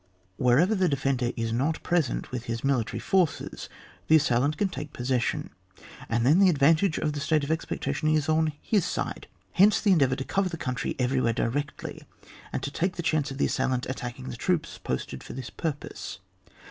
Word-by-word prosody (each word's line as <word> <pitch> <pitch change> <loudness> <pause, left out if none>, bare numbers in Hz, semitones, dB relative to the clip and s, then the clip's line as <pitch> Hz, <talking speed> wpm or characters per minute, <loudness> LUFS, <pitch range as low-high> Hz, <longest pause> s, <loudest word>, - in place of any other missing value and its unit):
Wherever 135 - +4
the 185 -4 +2
defender 135 -3 0
is 115 -1 -1
not 140 +7 0
present 170 -8 0
with 125 -2 -4
his 115 0 -4
military 135 -5 0
forces, 185 -5 0 0.4
the 160 - +6
assailant 145 0 +2
can 205 - +2
take 150 -2 -7
possession, 125 -1 -1 0.6
and 115 +1 +1
then 150 +8 +5
the 195 -2 +6
advantage 160 +3 +3
of 150 -1 -1
the 145 - -3
state 155 0 +1
of 140 - -2
expectation 160 -1 -1
is 155 -2 +2
on 155 0 +2
his 205 -5 +2
side; - - -3 0.2
hence 205 +3 +5
the 205 - +3
endeavour 135 -7 +4
to 135 - -4
cover 195 +6 0
the 170 - -5
country 130 -4 -3
everywhere 125 -2 +1
directly, 140 +6 -3 0.5
and - - -3
to 140 - -3
take 180 +5 -1
the 175 - -4
chance 155 -3 +1
of 135 - -6
the - - +2
assailant 130 -2 0
attacking 130 0 -5
the 120 - -7
troops 175 +3 -1
posted 65 - -4
for - - -8
this 130 -1 -7
purpose. 150 -3 -5
145 Hz, 185 wpm, -27 LUFS, 125-160 Hz, 0.6 s, the